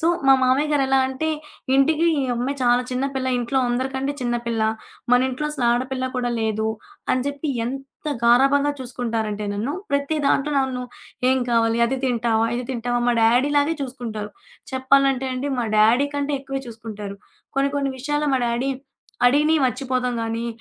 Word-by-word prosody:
So, 325 - +1 0.2
"మా 270 - +8
మామయ్య 260 +4 +3
గారు 290 -2 +3
ఎలా 270 0 +3
అంటే", 265 +4 -2 0.5
ఇంటికి 300 +4 +3 0.2
ఈ - - 0
అమ్మాయి 250 +4 -1
చాలా 245 0 +4
చిన్న 255 +1 -1
పిల్ల 260 -1 -1
ఇంట్లో 245 +2 0
అందరికంటే 265 +3 -1
చిన్న 240 -1 -1
పిల్ల, 230 -1 -1 0.5
మన 245 - +7
ఇంట్లో 260 +4 -3
అసలు 285 -5 -2
ఆడపిల్ల 255 +2 -1
కూడా 245 -1 0
లేదు 220 0 0 0.5
అని 255 0 0
చెప్పి 285 +2 -3 0.2
ఎంత 270 +5 -7 0.2
గారాబంగా 275 +4 +4
చూసుకుంటారంటే 225 -4 -3
నన్ను, 220 +8 -2 0.2
ప్రతి 280 +2 0
దాంట్లో 280 +1 +2
నన్ను 260 -2 -1 0.5
"ఏం 260 - +3
కావాలి. 230 0 +2
అది 265 +3 -1
తింటావా, 230 -3 +1
ఇది 250 - -3
తింటావా" 245 -1 -1
మా 240 - +3
డ్యాడీలాగే 285 +7 +3
చూసుకుంటారు. 230 -5 -5 0.4
చెప్పాలంటే 265 0 +2
అండి, 270 +3 -2
మా 240 - +1
డ్యాడీ 225 +6 +5
కంటే 285 0 -1
ఎక్కువే 270 0 -4
చూసుకుంటారు. 215 -3 -7 0.4
కొన్ని 275 +1 +2
కొన్ని 275 -1 0
విషయాలు 295 +3 -1
మా 260 - +1
డ్యాడీ 240 +3 0 0.6
అడిగిని 300 +4 +3
మర్చిపోతాం 255 0 -1
గాని, 225 +1 -2
255 Hz, 160 wpm, -22 LUFS, 235-275 Hz, 0.6 s, మా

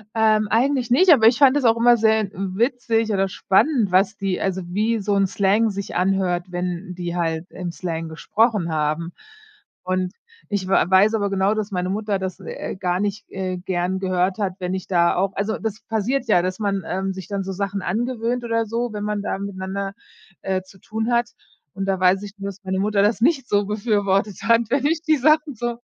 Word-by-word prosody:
Ähm, 215 -1 +3
eigentlich 250 +2 +1
nicht, 350 +9 +5
aber 230 -8 +7
ich 235 - +4
fand 280 -1 +5
es 275 - 0
auch 225 0 +4
immer 240 +1 +5
sehr 220 -2 +2
witzig 225 +3 0
oder 195 -1 +1
spannend, 205 - +2
was 190 +4 +3
die 195 -2 -2
also, 190 -1 -1
wie 215 +6 0
so 205 0 0
'n 195 -1 +3
Slang 200 +4 +2
sich 200 -1 -5
anhört, 180 -1 +1
wenn 180 +1 -4
die 175 -1 -4
halt 165 -1 -1
im 180 -2 -5
Slang 165 -2 -4
gesprochen 205 +2 0
haben. 155 +2 -1 0.7
Und 185 0 -1 0.4
ich 200 -2 -2
w - - -4
weiß 190 +4 +4
aber 205 -2 0
genau, 195 +1 +1
dass 215 -1 -3
meine 180 -1 -2
Mutter 205 0 -1
das, 190 -2 -5
äh, - - -6
gar 180 -1 -1
nicht, 205 +1 -3
äh, 185 -1 -3
gern 180 +1 -2
gehört 185 0 0
hat, 195 -3 -1
wenn 180 0 -3
ich 190 -1 -4
da 170 -2 +3
auch 195 +1 0
also, 210 +2 -1
das 220 -2 -4
passiert 230 +5 0
ja, 210 -5 +4
dass 185 +3 -3
man, 200 -3 -1
ähm, 190 +2 -2
sich 190 -1 -8
dann 200 -1 -3
so 190 - -5
Sachen 200 +1 -3
angewöhnt 240 +4 -2
oder 230 -1 0
so, 230 +1 -3
wenn 205 -1 -4
man 210 -1 -2
da 200 - -2
miteinander, 195 0 -4 0.5
äh, 190 -1 -1
zu 190 0 -19
tun 220 +5 -3
hat. 235 -1 +2 0.4
Und 195 +1 -3
da 195 -1 0
weiß 185 +2 +3
ich 200 - -8
nur, 195 - -5
dass 200 +1 -12
meine 190 0 -2
Mutter 205 0 +1
das 215 +2 +1
nicht 270 -1 +2
so 205 -3 +2
befürwortet 205 -2 0
hat, 230 0 +4
wenn 275 +2 +1
ich 320 +1 +1
die 315 -2 +3
Sachen 305 +2 +3
so 240 +1 -3
200 Hz, 210 wpm, -22 LUFS, 185-225 Hz, 0.7 s, aber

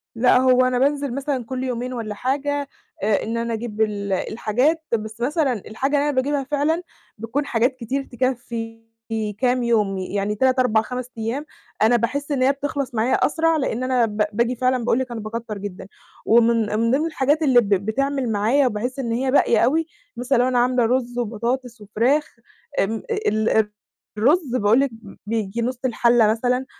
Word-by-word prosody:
لأ، 250 +2 +4
هو 255 0 +4
أنا 250 -1 +1
بانزِل 280 -2 0
مثلًا 275 -3 -2
كل 260 +1 -4
يومين 250 0 -3
والّا 225 -4 -4
حاجة، 285 +4 -1 0.4
آآ، 210 -1 +2
إن 230 +1 -3
أنا 230 0 -2
أجيب 220 -1 -4
ال 200 -2 -1
الحاجات، 250 - 0
بس 220 0 -3
مثلًا 280 +1 +1
الحاجة 250 +7 -2
اللي 290 +1 +1
أنا 285 - -2
باجيبها 275 +2 0
فعلًا 295 +5 0 0.4
بتكون 230 +7 -2
حاجات 245 +2 +1
كتير 255 +3 -3
تكفّي 235 -3 -4 0.5
كام 250 -1 +1
يوم، 210 -5 +1
يعني 200 +2 -2
3،4،5 250 0 +1
أيام، 235 +7 -3 0.4
أنا 225 +3 +5
باحس 285 +6 -1
إن 270 - 0
هي 270 - +5
بتخلص 280 -2 -4
معايا 225 +4 +1
أسرع، 325 +1 +1
لإن 255 -3 -2
أنا 255 -2 +2
ب 210 -1 0
باجي 235 +3 +1
فعلًا 255 0 +1
باقول 240 +1 +2
لِك 260 -1 -3
أنا 235 - -4
باكتّر 215 0 -5
جدًا. 195 -2 -7 0.4
ومن 225 -2 +3
من 230 +1 +2
ضمن 290 +4 +2
الحاجات 305 -1 +1
اللي 260 -5 +5
ب 210 - -5
بتعمل 240 +6 0
معايا، 230 +7 +2
وبحس 245 +4 -3
إن 240 -4 -2
هي 260 +3 0
باقية 235 -4 +4
أوي، 310 +8 +2 0.3
مثلًا 250 +2 +1
لو 245 +1 +3
أنا 250 -1 +2
عاملة 245 -1 +2
رز 245 0 -1
وبطاطس 235 +1 -3
وفراخ، 240 +10 0 0.4
آمم، 220 +3 -1
ال 230 - 0 0.7
الرز 270 - +2
باقول 220 +1 +4
لِك 275 - +2
ب 225 -3 -13
بييجي 220 0 -2
نُص 250 +1 -2
الحلة 235 -2 +3
مثلًا، 245 +4 0
245 Hz, 175 wpm, -22 LUFS, 225-270 Hz, 0.7 s, أنا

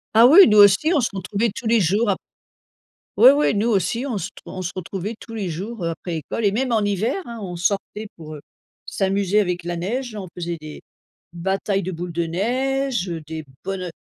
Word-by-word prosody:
Ah 230 - +8
oui, 330 +10 +9
nous 210 -2 +4
aussi, 205 - +6
on 300 -7 +3
se 235 - 0
retrouvait 200 +4 -1
tous 230 - -5
les 230 0 +4
jours 205 +5 +2
ap 195 - +1 1.0
oui, 255 - +9
oui, 290 -6 +2
nous 215 +4 +1
aussi, 220 +4 0
on 240 -7 -2
se - - -4
t - - -16
on 185 - -6
se 180 - -4
retrouvait 190 +4 -5
tous 230 - -12
les 205 -5 -3
jours, 190 +4 -5
heu, 165 - 0
après 175 +2 -7
l'école 160 +8 -4
et 200 - +4
même 255 +3 -1
en 220 -2 +2
hiver, 215 - -1
hein, 235 -1 -8
on 180 -3 -6
sortait 200 +4 -2
pour, 155 -2 -9
heu, 145 - -9 0.4
s'amuser 195 +1 0
avec 180 -3 -1
la 175 0 -4
neige, 230 +6 -3
on 190 -2 -6
faisait 170 -1 -4
des 155 -1 -10 0.5
batailles 195 +3 -1
de 185 - -3
boules 170 +1 -5
de 170 0 -1
neige, 250 +4 -1
heu, 165 -2 -5
des 160 -1 -6 0.2
bonho 185 -1 -4
200 Hz, 220 wpm, -22 LUFS, 175-230 Hz, 1.0 s, oui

